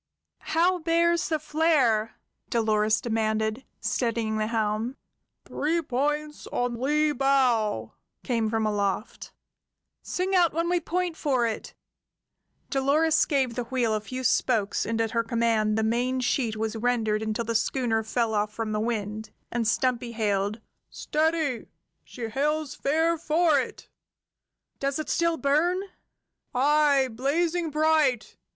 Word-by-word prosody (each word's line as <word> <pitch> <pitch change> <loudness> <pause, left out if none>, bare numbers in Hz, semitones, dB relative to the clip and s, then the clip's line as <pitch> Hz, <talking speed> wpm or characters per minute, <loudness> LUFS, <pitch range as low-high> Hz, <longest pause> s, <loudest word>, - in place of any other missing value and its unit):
"How 355 +2 +3
bears 335 +1 +2
the 315 - +1
flare?" 295 -9 +1 0.3
Dolores 215 -1 +2
demanded, 220 +1 -1 0.2
steadying 230 -3 -1
the 215 - 0
helm. 220 +3 -1 0.5
"Three 320 +4 -1
points 295 +3 -2
on 245 -1 -2
lee 300 +3 +2
bow!" 255 -6 +1 0.3
came 230 -4 0
from 220 0 0
aloft. 205 0 -2 0.7
"Sing 370 +2 -2
out 350 -3 +4
when 335 +2 0
we 355 0 +2
point 355 0 -2
for 265 -7 +1
it!" 225 -1 -4 1.0
Dolores 300 +4 +3
gave 265 -5 0
the 245 0 -3
wheel 240 -3 0
a 215 - -1
few 255 +4 -6
spokes, 225 -4 +1
and 230 0 -1
at 225 -1 0
her 230 -1 +1
command 225 -2 +1
the 220 - +1
main 245 +4 0
sheet 245 -3 0
was 220 +1 -2
rendered 225 -2 0
until 220 +1 -2
the 230 - -2
schooner 230 0 +1
fell 220 +1 -1
off 210 0 0
from 220 0 -4
the 210 - -1
wind, 215 -1 -3 0.2
and 235 -2 -1
Stumpy 240 0 0
hailed: 210 -1 -1 0.3
"Steady! 310 -5 -1 0.4
She 245 - -10
heads 295 +5 -1
fair 320 +3 +1
for 320 -1 +3
it!" - - -6 0.9
"Does 275 0 -1
it 310 - -4
still 335 -1 +1
burn?" 315 +6 +2 0.8
"Aye, 285 0 +4
blazing 320 +8 0
bright! 305 -5 +1
245 Hz, 135 wpm, -26 LUFS, 220-305 Hz, 1.0 s, out